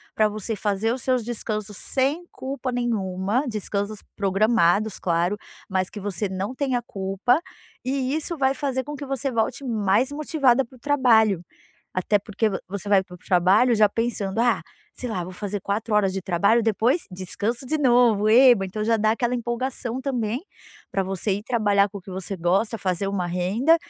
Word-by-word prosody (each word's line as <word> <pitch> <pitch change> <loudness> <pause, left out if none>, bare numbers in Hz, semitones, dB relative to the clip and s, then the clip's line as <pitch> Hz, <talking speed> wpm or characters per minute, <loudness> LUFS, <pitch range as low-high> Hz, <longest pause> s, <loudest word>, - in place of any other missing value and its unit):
pra 215 -1 +3
você 215 +1 -4
fazer 205 +2 0
os 255 - -5
seus 255 -2 +1
descansos 215 -3 -4
sem 280 - -1
culpa 260 -1 -4
nenhuma, 215 -1 -1
descansos 210 -1 -3 0.2
programados, 205 0 +2
claro, 175 +3 0 0.3
mas 185 -2 -1
que 210 - -8
você 200 0 -3
não 190 +5 -3
tenha 260 -3 0
culpa, 195 - 0 0.4
e 265 0 -1
isso 320 +1 -3
vai 265 -1 +2
fazer 265 -1 -2
com 295 +2 -6
que 285 - -6
você 270 0 -2
volte 230 +3 -1
mais 225 +2 +1
motivada 280 -4 +2
para 255 +1 -16
o - - -24
trabalho. 230 - +3 0.5
Até 195 +3 +1
porque 215 +2 -1
vo 190 - -2
você 200 +1 -6
vai 195 -2 +5
para 180 -1 -12
o - - -14
trabalho 190 +8 +3
já 210 -1 +5
pensando: 225 -2 -2
"Ah, 240 +1 +3 0.3
sei 250 - -5
lá, 180 -5 -2
vou 185 +1 -8
fazer 205 +1 -4
4 210 +2 -1
horas 195 -2 +3
de 195 - -3
trabalho, 200 +6 +3
depois, 230 - +2
descanso 205 +7 -3
de 310 +5 0
novo, 240 -6 +4
eba." 240 -2 +7
Então 200 +3 -3
já 225 +1 +3
dá 215 0 +2
aquela 240 +2 0
empolgação 245 +1 -3
também, 245 -4 -1 0.5
pra 195 - +1
você 195 +2 -2
ir 205 - -4
trabalhar 205 -4 +2
com 200 - -8
o - - -10
que 185 - -11
você 190 +1 -5
gosta, 195 +7 +1
fazer 190 -1 -1
uma 195 -2 -1
renda 190 - +2
215 Hz, 185 wpm, -24 LUFS, 195-250 Hz, 0.5 s, eba